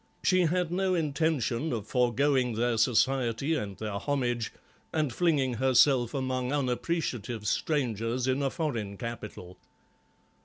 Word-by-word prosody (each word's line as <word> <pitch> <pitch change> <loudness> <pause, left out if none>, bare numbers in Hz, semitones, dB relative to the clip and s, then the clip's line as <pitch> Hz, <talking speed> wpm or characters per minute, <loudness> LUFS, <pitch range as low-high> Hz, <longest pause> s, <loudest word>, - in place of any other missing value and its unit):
She 185 -1 +4
had 175 0 0
no 185 +1 +1
intention 155 -3 0
of 110 -4 -3
foregoing 125 +1 +2
their 120 +1 +1
society 130 +3 +2
and 105 -10 -3
their 105 -2 -4
homage 120 -4 -1 0.4
and 150 -6 0
flinging 145 -5 +2
herself 130 +1 +3
among 130 -1 -1
unappreciative 125 -5 -2
strangers 120 - 0
in 130 +2 +1
a 135 - +1
foreign 120 - -3
capital. 105 -6 -7
130 Hz, 120 wpm, -29 LUFS, 115-145 Hz, 0.4 s, She